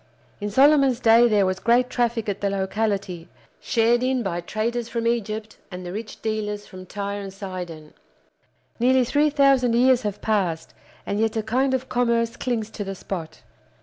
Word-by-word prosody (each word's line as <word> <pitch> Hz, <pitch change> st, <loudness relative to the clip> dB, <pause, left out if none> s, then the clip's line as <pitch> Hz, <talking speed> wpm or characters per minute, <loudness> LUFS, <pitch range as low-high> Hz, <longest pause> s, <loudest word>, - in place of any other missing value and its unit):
In 205 Hz, -1 st, -3 dB
Solomon's 270 Hz, +1 st, +4 dB
day 230 Hz, 0 st, +6 dB
there 210 Hz, -3 st, +3 dB
was 185 Hz, 0 st, -1 dB
great 240 Hz, +3 st, +3 dB
traffic 235 Hz, -3 st, -1 dB
at 200 Hz, -1 st, -3 dB
the 200 Hz, -, +1 dB
locality, 195 Hz, -3 st, -2 dB, 0.3 s
shared 235 Hz, +1 st, +2 dB
in 255 Hz, -1 st, 0 dB
by 175 Hz, -3 st, -2 dB
traders 230 Hz, +5 st, -3 dB
from 230 Hz, 0 st, -3 dB
Egypt 220 Hz, -2 st, -2 dB
and 180 Hz, -2 st, -8 dB
the 175 Hz, -, -6 dB
rich 215 Hz, +1 st, -7 dB
dealers 210 Hz, -2 st, -3 dB
from 185 Hz, -1 st, -11 dB
Tyre 200 Hz, +1 st, -4 dB
and 195 Hz, -1 st, -7 dB
Sidon. 180 Hz, -5 st, -8 dB, 0.9 s
Nearly 255 Hz, +1 st, +4 dB
three 290 Hz, +5 st, +2 dB
thousand 275 Hz, -4 st, +3 dB
years 255 Hz, +1 st, +4 dB
have 210 Hz, -3 st, -4 dB
passed, 180 Hz, -7 st, -1 dB, 0.3 s
and 200 Hz, -, -2 dB
yet 225 Hz, 0 st, 0 dB
a 220 Hz, -, -1 dB
kind 260 Hz, +5 st, +1 dB
of 260 Hz, 0 st, -4 dB
commerce 235 Hz, -1 st, +1 dB
clings 225 Hz, -4 st, -3 dB
to 205 Hz, -, -5 dB
the 195 Hz, 0 st, -5 dB
spot. 175 Hz, -4 st, -7 dB
220 Hz, 175 wpm, -23 LUFS, 195-240 Hz, 0.9 s, day